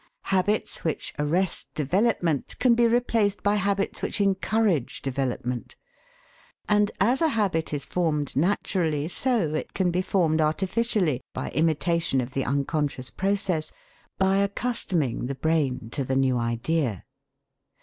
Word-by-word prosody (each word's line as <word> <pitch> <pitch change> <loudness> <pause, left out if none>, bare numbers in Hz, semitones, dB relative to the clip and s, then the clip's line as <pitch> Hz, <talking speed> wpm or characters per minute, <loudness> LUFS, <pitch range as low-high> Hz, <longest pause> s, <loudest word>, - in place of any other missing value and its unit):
Habits 200 +3 0
which 160 - -2
arrest 170 +5 0
development 170 - 0
can 250 -2 +4
be 235 0 +4
replaced 230 -4 +1
by 205 - +3
habits 200 -1 0
which - - -2
encourage 195 - +1
development. 125 -2 -3 0.9
And 210 -1 +3
as 240 - +3
a 325 - +4
habit 200 - 0
is 145 -2 -2
formed 155 -5 -1
naturally, 160 -2 0
so 220 - +1
it 155 - -4
can 185 -2 +1
be 180 +2 +1
formed 165 -5 +1
artificially, 180 - 0
by - - -4
imitation 165 -1 +1
of 125 0 -3
the 135 -1 -2
unconscious 140 -1 -1
process, 190 -4 -1 0.5
by 190 0 +3
accustoming 200 - -1
the 140 - -3
brain 135 -6 0
to 140 - -2
the 130 +1 -1
new 135 -1 +2
idea. 120 - -1
165 Hz, 130 wpm, -26 LUFS, 140-200 Hz, 0.9 s, can